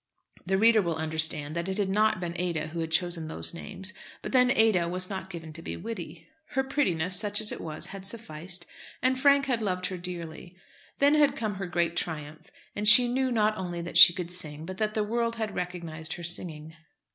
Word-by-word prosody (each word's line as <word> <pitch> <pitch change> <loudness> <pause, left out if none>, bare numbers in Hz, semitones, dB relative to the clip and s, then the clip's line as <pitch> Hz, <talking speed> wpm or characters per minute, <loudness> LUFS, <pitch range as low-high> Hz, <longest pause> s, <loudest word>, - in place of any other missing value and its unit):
The 190 +1 +1
reader 225 +1 +5
will 170 -3 -2
understand 155 -1 +1
that 170 +2 -3
it 190 - -3
had 205 -2 0
not 210 +1 +1
been 175 -2 -4
Ada 165 -3 -2
who 170 +2 -6
had 165 -1 -3
chosen 170 -1 -1
those 80 - -1
names; 185 - -8 0.3
but - - -5
then 250 -1 +4
Ada 220 -8 +3
was 185 +2 -1
not 190 -1 -6
given 165 -3 -9
to 165 - -8
be - - -6
witty. 175 -8 -8 0.3
Her 265 - +2
prettiness, 185 - 0
such 205 +2 +3
as 215 - +1
it - - -6
was, 155 -2 -5
had 195 -1 -8
sufficed, 180 -5 -5 0.4
and 255 0 +1
Frank 280 0 +4
had 250 -4 0
loved 185 -3 -2
her 185 - -3
dearly. 175 0 -7 0.4
Then 285 +1 +4
had 300 -2 +3
come 215 -2 -3
her 195 -1 -5
great 170 -1 -1
triumph, 155 -1 -5 0.3
and 210 +1 -1
she 245 +2 +10
knew 260 +1 -1
not 215 -2 +1
only 175 -2 -5
that 170 - -8
she - - +10
could 175 0 -6
sing, 155 -3 -2
but 185 +2 -8
that 215 -1 -1
the 215 - +1
world 230 +2 -2
had 220 -3 -4
recognised 170 -3 -4
her 175 - -8
singing. 160 -2 -4
180 Hz, 215 wpm, -27 LUFS, 165-215 Hz, 0.4 s, she